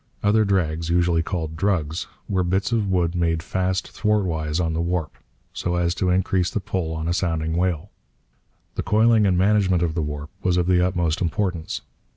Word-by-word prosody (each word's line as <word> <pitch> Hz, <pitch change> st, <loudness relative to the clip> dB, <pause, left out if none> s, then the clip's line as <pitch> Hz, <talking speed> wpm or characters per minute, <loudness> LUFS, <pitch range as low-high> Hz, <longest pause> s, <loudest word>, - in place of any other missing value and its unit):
Other 110 Hz, +1 st, +4 dB
drags, 85 Hz, -4 st, 0 dB
usually 85 Hz, -1 st, +2 dB
called 80 Hz, -2 st, -3 dB
'drugs,' 85 Hz, -3 st, -1 dB, 0.2 s
were 95 Hz, -2 st, +1 dB
bits 95 Hz, +5 st, 0 dB
of 110 Hz, -3 st, +1 dB
wood 90 Hz, -3 st, +1 dB
made 85 Hz, -2 st, 0 dB
fast 95 Hz, +1 st, -1 dB
thwart 105 Hz, -2 st, +1 dB
wise 80 Hz, -2 st, -2 dB
on 80 Hz, -2 st, 0 dB
the 80 Hz, -, -1 dB
warp, 85 Hz, -2 st, -2 dB, 0.4 s
so 90 Hz, -, -2 dB
as 85 Hz, -1 st, +1 dB
to 90 Hz, +1 st, 0 dB
increase 90 Hz, 0 st, +1 dB
the -, -, -2 dB
pull 90 Hz, -4 st, -3 dB
on 80 Hz, 0 st, -3 dB
a 85 Hz, -, +1 dB
sounding 80 Hz, -3 st, -1 dB
whale. 90 Hz, +1 st, -1 dB, 0.8 s
The -, -, -2 dB
coiling 110 Hz, +1 st, +4 dB
and 90 Hz, -2 st, +2 dB
management 95 Hz, -2 st, +3 dB
of 80 Hz, -2 st, 0 dB
the 80 Hz, -, -1 dB
warp 75 Hz, 0 st, -5 dB
was 90 Hz, -1 st, +1 dB
of 90 Hz, -, +2 dB
the 90 Hz, 0 st, +3 dB
utmost 85 Hz, -3 st, 0 dB
importance. 90 Hz, -1 st, -2 dB
90 Hz, 190 wpm, -23 LUFS, 80-95 Hz, 0.8 s, Other